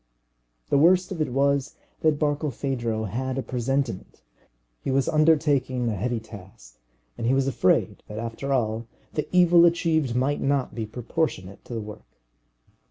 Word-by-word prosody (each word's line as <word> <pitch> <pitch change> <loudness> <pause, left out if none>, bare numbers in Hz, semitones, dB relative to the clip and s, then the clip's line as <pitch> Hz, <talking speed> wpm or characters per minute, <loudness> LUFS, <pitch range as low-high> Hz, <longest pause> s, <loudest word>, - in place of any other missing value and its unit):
The 140 - +3
worst 180 +4 +4
of 170 -4 -3
it 145 -5 -1
was 140 +1 +1 0.2
that 155 -2 +2
Barkilphedro 135 -6 -1
had 130 +6 -3
a 135 - -1
presentiment. 125 - -3 0.6
He - - -3
was 135 0 +1
undertaking 145 -5 +2
a 110 - -2
heavy 120 +4 -1
task, 90 - -14 0.4
and 115 - -1
he 130 - +3
was 135 0 +2
afraid 135 - +1
that 105 - -8
after 115 +4 -4
all 115 -3 0 0.3
the 150 - -2
evil 175 -1 +6
achieved 165 -6 +2
might 135 +4 0
not 140 -2 0
be 110 -2 -4
proportionate 110 - -3
to 120 - -7
the 115 - -3
work. 105 0 -11
130 Hz, 155 wpm, -25 LUFS, 115-150 Hz, 0.6 s, evil